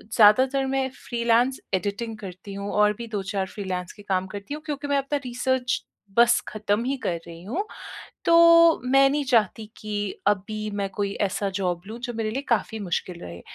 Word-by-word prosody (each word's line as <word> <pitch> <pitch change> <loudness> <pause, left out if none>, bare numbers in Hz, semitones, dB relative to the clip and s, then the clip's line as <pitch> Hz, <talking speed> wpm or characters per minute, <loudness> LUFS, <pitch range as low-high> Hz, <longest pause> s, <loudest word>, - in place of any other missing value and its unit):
ज़्यादातर 260 +5 +5
मैं 265 0 0
freelance 240 +2 +1
editing 205 +4 -2
करती 195 0 -9
हूँ 200 +1 -4
और 210 0 +4
भी 235 - -6
2-4 200 -2 -2
फ्रीलांस 185 -2 -4
के 205 - -14
काम 190 -2 -1
करती 200 +7 -7
हूँ 300 - -6
क्योंकि 290 -1 -4
मैं 285 0 +2
अपना 275 +1 0
रिसर्च 250 +1 0 0.4
बस 235 0 +6
ख़त्म 215 +1 -1
ही 275 - 0
कर 170 - 0
रही 170 0 -10
हूँ, 280 - -2 0.6
तो 335 0 +7
मैं 270 +1 +5
नहीं 290 +1 0
चाहती 220 -1 +2
कि 205 -2 -4
अभी 215 +2 0
मैं 200 -1 -1
कोई 200 0 -2
ऐसा 200 +1 -2
जॉब 180 -2 -1
लूँ 225 +3 -7
जो 240 - -4
मेरे 220 -1 -1
लिए 265 +5 -2
काफ़ी 220 -1 0
मुश्किल 180 -2 -3
रहे। 85 0 -8
215 Hz, 180 wpm, -25 LUFS, 200-260 Hz, 0.6 s, तो